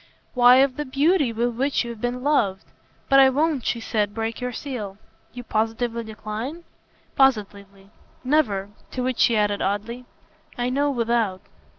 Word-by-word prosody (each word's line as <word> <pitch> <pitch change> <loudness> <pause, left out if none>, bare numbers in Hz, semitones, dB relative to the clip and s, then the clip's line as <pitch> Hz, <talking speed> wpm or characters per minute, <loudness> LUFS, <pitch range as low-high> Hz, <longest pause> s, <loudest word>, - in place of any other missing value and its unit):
"Why 245 0 +7
of 265 0 +3
the 295 - -2
beauty 285 +1 +2
with 235 +2 -1
which 270 +1 0
you've 235 -2 -8
been 245 +1 -3
loved. 215 -10 +1 0.4
But 275 -1 +5
I 265 -1 +7
won't," 290 -1 0
she 235 - 0
said, 210 -2 -2
"break 225 +1 -3
your 250 0 -2
seal." 225 -7 -6 0.3
"You 245 - -8
positively 225 +1 -1
decline?" 220 +9 -6 0.5
"Positively. 200 -6 0 0.3
Never." 220 -9 +1 0.2
To 255 - -2
which 255 -1 -2
she 230 - +4
added 205 -1 +1
oddly: 220 +5 -3 0.5
"I 245 +1 -1
know 285 +2 +1
without." 230 -6 0
240 Hz, 155 wpm, -23 LUFS, 215-265 Hz, 0.5 s, Why